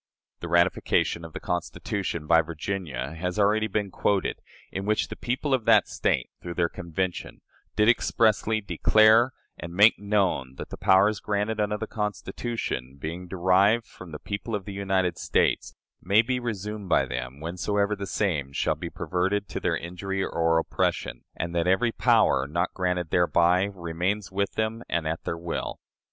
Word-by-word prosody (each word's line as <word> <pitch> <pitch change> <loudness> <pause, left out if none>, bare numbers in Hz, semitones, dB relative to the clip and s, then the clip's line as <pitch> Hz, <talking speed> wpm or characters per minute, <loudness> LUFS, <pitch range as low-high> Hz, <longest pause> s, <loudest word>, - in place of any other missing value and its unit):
The 85 - -6
ratification 85 -1 +2
of 80 -1 -9
the - - -5
Constitution 90 -1 -3
by 80 +1 +5
Virginia 80 -3 -4
has 90 +4 -3
already 105 +1 +3
been 105 -1 -2
quoted, 100 0 0 0.3
in 95 +1 -4
which 110 0 +1
the - - -6
people 135 +3 -2
of 125 -4 +1
that - - +5
State, - - -1
through 85 -1 -6
their 85 -1 +1
Convention, 85 +1 -4 0.3
did 105 0 +3
expressly 110 -2 +2
"declare 110 +4 +4 0.3
and 85 +2 -7
make 105 +4 +6
known 95 -11 0
that - - -8
the - - -6
powers 100 +1 +4
granted 105 +1 -1
under 105 0 0
the 110 - -4
Constitution, 105 - -4
being 85 +5 -5
derived 95 +5 +3
from 90 -3 -12
the 75 - -5
people 105 +6 -4
of 100 -2 -5
the 100 - -6
United 95 -2 0
States, - - +1 0.3
may 100 +5 +4
be 125 +2 -1
resumed 105 -4 -5
by - - +4
them, 65 +2 -5
whensoever 100 +5 -1
the 100 -1 -6
same 75 -12 -1
shall - - +1
be - - -6
perverted 95 +3 -1
to - - -4
their - - 0
injury 95 +3 -4
or 80 0 +1
oppression, 80 - -1
and 85 +1 -4
that 85 0 0
every 115 +6 +3
power 110 - +3
not 85 +4 -1
granted 90 -2 -1
thereby 90 +1 +3
remains 95 +2 -3
with 100 +1 -1
them 110 +1 -2
and 85 -2 -1
at 80 +1 -3
their 85 - -2
will." 85 0 -4
95 Hz, 170 wpm, -26 LUFS, 85-105 Hz, 0.3 s, make